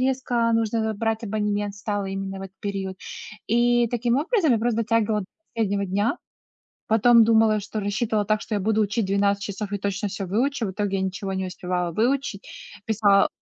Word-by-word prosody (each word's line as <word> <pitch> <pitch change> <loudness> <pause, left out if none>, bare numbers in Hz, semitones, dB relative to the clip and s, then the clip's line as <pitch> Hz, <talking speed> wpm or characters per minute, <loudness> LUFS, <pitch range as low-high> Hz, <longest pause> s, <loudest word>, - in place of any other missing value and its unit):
резко 255 -3 +1
нужно 225 -1 0
брать 225 +2 -1
абонемент 205 -1 -1
стало 200 0 -2
именно 195 0 -4
в - - -6
этот 190 0 -10
период. 195 -2 -4 0.5
И, 240 +1 +3
таким 240 +1 0
образом, 335 - +2
я 230 - +3
просто 230 0 0
затягивала 220 -1 +1
до 190 - -7 0.3
последнего 200 -3 0
дня. 205 +5 0 0.7
Потом 230 +1 +6
думала, 220 -1 +4
что 215 +2 -5
рассчитывала 210 +1 0
так, 215 0 +1
что 220 - -5
я - - 0
буду 220 +2 +1
учить 210 +1 0
12 200 +1 +1
часов 200 +1 -5
и 200 - -1
точно 200 +1 -2
всё 195 -1 -5
выучу. 240 +5 0
В - - -3
итоге 200 0 -1
я 190 - -1
ничего 190 +1 -3
не 190 0 -2
успевала 180 -1 -2
выучить. 240 +1 -1 0.4
Писала 205 -2 +4
210 Hz, 185 wpm, -24 LUFS, 200-230 Hz, 0.7 s, Потом